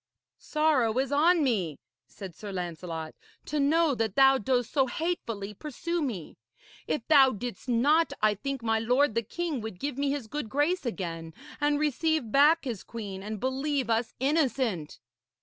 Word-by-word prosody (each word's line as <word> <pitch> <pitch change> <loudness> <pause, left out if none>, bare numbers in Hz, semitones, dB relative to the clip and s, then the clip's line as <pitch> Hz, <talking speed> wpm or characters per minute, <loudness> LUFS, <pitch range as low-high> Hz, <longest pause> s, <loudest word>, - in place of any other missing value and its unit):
'Sorrow 290 -7 +1
is 265 +1 0
on 320 +3 +4
me,' 190 - 0 0.3
said 185 +9 -9
Sir 205 -2 -8
Lancelot, 170 -3 -5 0.3
'to 300 - -2
know 310 +2 +3
that 225 -4 -2
thou 270 0 +6
dost 245 +1 0
so 270 -3 +2
hatefully 235 - -3
pursue 325 - -4
me. 215 - -5 0.5
If 160 +8 -2
thou 280 -4 +7
didst 245 +2 -6
not, 290 +8 +3
I 215 0 +3
think 270 +4 -5
my 225 -1 +1
lord 250 +3 +2
the 230 - +1
king 310 - -3
would 220 -4 -7
give 280 -1 -3
me 285 0 +1
his 280 -3 -2
good 225 +1 -5
grace 290 +3 0
again, 165 -7 -5 0.2
and 290 0 +2
receive 305 -4 0
back 295 +4 +5
his 230 -7 -4
queen 200 -5 -7
and 210 +1 -5
believe 265 +1 -1
us 225 +1 0
innocent.' 260 - 0
255 Hz, 165 wpm, -28 LUFS, 215-290 Hz, 0.5 s, thou